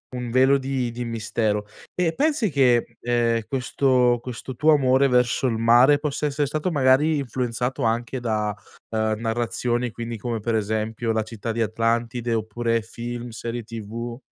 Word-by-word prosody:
un 125 -1 -4
velo 130 +2 +5
di 130 -2 -2
di 120 +1 -5
mistero. 110 -2 -1 0.3
Eh, 175 -2 +1
pensi 285 -6 +1
che, 120 -4 +2
ehm, 120 -1 +1
questo 125 -1 +2
questo 125 +1 -7
tuo 155 +5 +4
amore 135 -1 +4
verso 125 +1 +2
il 115 -3 0
mare 120 +5 +6
possa 150 0 -1
essere 145 0 -1
stato 155 +5 -2
magari 145 +2 +3
influenzato 125 -1 -2
anche 120 +3 -1
da, 105 -3 -1 0.3
uhm, 110 -1 0
narrazioni 120 +1 -1
quindi, 115 0 -5
come 115 +1 -3
per 115 +2 -2
esempio, 110 +2 -1
la 110 -1 0
città 115 +1 -5
di 115 - -2
Atlantide, 115 +2 0
oppure 115 +1 -1
film, 120 +2 -6
serie 115 +1 -5
TV? 115 +2 -6
120 Hz, 155 wpm, -23 LUFS, 115-130 Hz, 0.3 s, mare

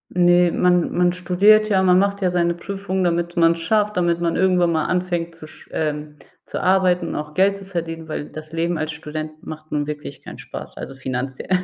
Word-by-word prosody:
Ne, 175 0 +5
man 180 -1 +2
man 175 0 +3
studiert 200 +4 +4
ja, 190 -2 +3
man 180 -1 +5
macht 200 0 0
ja 185 - +2
seine 170 -1 +1
Prüfung, 190 +1 -3
damit 175 0 -1
man's 165 0 +4
schafft, 210 +4 +1
damit 170 -1 +1
man 170 -1 0
irgendwann 180 -2 +3
mal 160 -1 0
anfängt 175 -2 -1
zu 155 -1 -11
sch - - -16
ähm, 150 -1 -3 0.3
zu - - -5
arbeiten 180 -2 +3
und - - -4
auch 150 0 -6
Geld 195 +1 +3
zu 195 - -11
verdienen, 165 -3 -5
weil 155 - -4
das 155 +1 -9
Leben 165 0 -1
als 155 0 -2
Student 155 0 -7
macht 155 0 -9
nun 145 -1 -1
wirklich 150 -1 -7
keinen - - -10
Spaß. - - -9
Also 135 - -7
finanziell. 130 +2 -5
170 Hz, 205 wpm, -21 LUFS, 155-185 Hz, 0.3 s, Ne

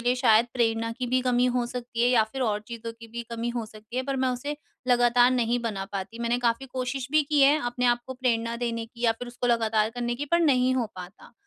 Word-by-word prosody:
लिए 245 +1 +2
शायद 235 -2 +4
प्रेरणा 230 -2 +1
की 250 +2 -4
भी 255 +1 +2
कमी 250 -1 +2
हो 245 - +1
सकती 240 -1 -4
है 240 - +4
या 245 -3 +5
फिर 265 - -2
और 210 -3 0
चीज़ों 230 -1 -6
की 230 0 -13
भी 235 +1 -5
कमी 230 +1 -3
हो 230 - -2
सकती 215 +2 -11
है 255 - +1
पर 275 0 -2
मैं 260 - +2
उसे 270 +4 -3 0.3
लगातार 245 0 +5
नहीं 245 -1 +1
बना 205 -4 -3
पाती। 200 +3 -5
मैंने 235 +1 +1
काफ़ी 240 +2 0
कोशिश 255 0 -3
भी 305 +1 +4
की 290 0 +1
है, 290 +3 +5
अपने 245 +1 -1
आप 240 0 +3
को 260 - -6
प्रेरणा 235 -2 0
देने 230 -1 -3
की 235 +1 -17
या 230 - +5
फिर 240 +2 -8
उसको 245 +1 -3
लगातार 225 -2 +2
करने 240 0 -2
की, 285 +4 -4
पर 340 +4 +2
नहीं 260 -5 +3
हो 245 -3 0
पाता। 180 +2 -11
240 Hz, 250 wpm, -26 LUFS, 230-255 Hz, 0.3 s, या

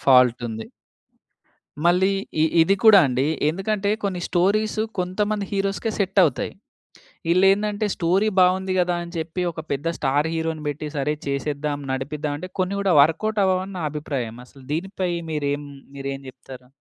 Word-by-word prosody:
Fault 125 -3 +5
ఉంది. 110 0 -6 1.2
మళ్ళీ 180 +3 +4 0.3
ఈ - - +6 0.2
ఇది 195 +5 +3
కూడా 215 -2 +9
అండి. 130 +2 0 0.2
ఎందుకంటే 195 +4 -1
కొన్ని 185 -3 -1
స్టోరీస్ 210 +5 +1 0.2
కొంతమంది 205 +3 -1
హీరోస్‌‌కే 195 +3 -1
సెట్ 195 -1 0
అవుతాయి. 145 -7 -1 0.8
ఈలేందంటే 205 +3 +3
స్టోరీ 185 +5 +2
బాగుంది 185 +1 +3
కదా! 175 -1 +2
అని 170 - -10
చెప్పి 165 +3 -3
ఒక 160 - -9
పెద్ద 140 +3 -2
స్టార్ 145 +3 +1
హీరో‌ని 160 -1 -2
పెట్టి 145 +1 -3
సరే 145 +2 0
చేసేద్దాం 145 +1 -2
నడిపిద్దాం 145 +3 -3
అంటే 185 - -7
కొన్ని 185 +2 0
కూడా 195 -2 +2
వర్కౌట్ 205 +8 +2
అవ్వవని 190 +1 0
నా 175 - -4
అభిప్రాయం. 140 -6 -4
అసలు 135 +1 -17
దీనిపై 185 +2 -2 0.2
మీరేం, 145 -1 -1 0.3
మీరేం 135 0 -5
చెప్తారు? 130 -1 -13
170 Hz, 145 wpm, -23 LUFS, 145-195 Hz, 1.2 s, కూడా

